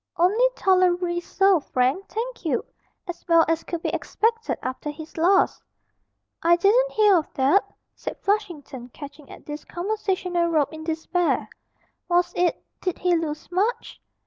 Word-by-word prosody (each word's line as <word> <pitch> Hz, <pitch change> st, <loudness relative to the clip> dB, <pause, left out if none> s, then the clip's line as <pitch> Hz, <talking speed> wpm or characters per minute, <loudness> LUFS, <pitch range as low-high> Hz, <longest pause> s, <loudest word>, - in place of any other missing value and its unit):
'Only 420 Hz, +9 st, +4 dB
tolerably 360 Hz, -2 st, +2 dB
so, 385 Hz, +1 st, +3 dB
Frank, 270 Hz, +7 st, 0 dB
thank 480 Hz, +1 st, -5 dB
you; 320 Hz, -, -1 dB, 0.4 s
as 350 Hz, -, -7 dB
well 335 Hz, -1 st, +5 dB
as 325 Hz, 0 st, 0 dB
could 340 Hz, -1 st, -5 dB
be -, -, 0 dB
expected 455 Hz, +1 st, -1 dB
after 260 Hz, +3 st, -4 dB
his 310 Hz, +2 st, -9 dB
loss.' 365 Hz, +4 st, +3 dB, 0.8 s
'I 340 Hz, +1 st, +5 dB
didn't 455 Hz, +8 st, +3 dB
hear 420 Hz, -2 st, +5 dB
of 315 Hz, -, -3 dB
that,' 275 Hz, +9 st, +2 dB, 0.2 s
said -, -, -7 dB
Flushington, 340 Hz, -, -3 dB
catching 285 Hz, +2 st, -11 dB
at -, -, -13 dB
this 295 Hz, 0 st, -7 dB
conversational 365 Hz, -2 st, -1 dB
rope 315 Hz, -3 st, +1 dB
in 315 Hz, 0 st, -8 dB
despair. 325 Hz, +2 st, 0 dB, 0.6 s
'Was 350 Hz, 0 st, +2 dB
it 350 Hz, -1 st, 0 dB, 0.2 s
did 365 Hz, -2 st, -2 dB
he 360 Hz, -1 st, +2 dB
lose 310 Hz, 0 st, -4 dB
much?' 410 Hz, +7 st, -1 dB
350 Hz, 145 wpm, -24 LUFS, 315-390 Hz, 0.8 s, well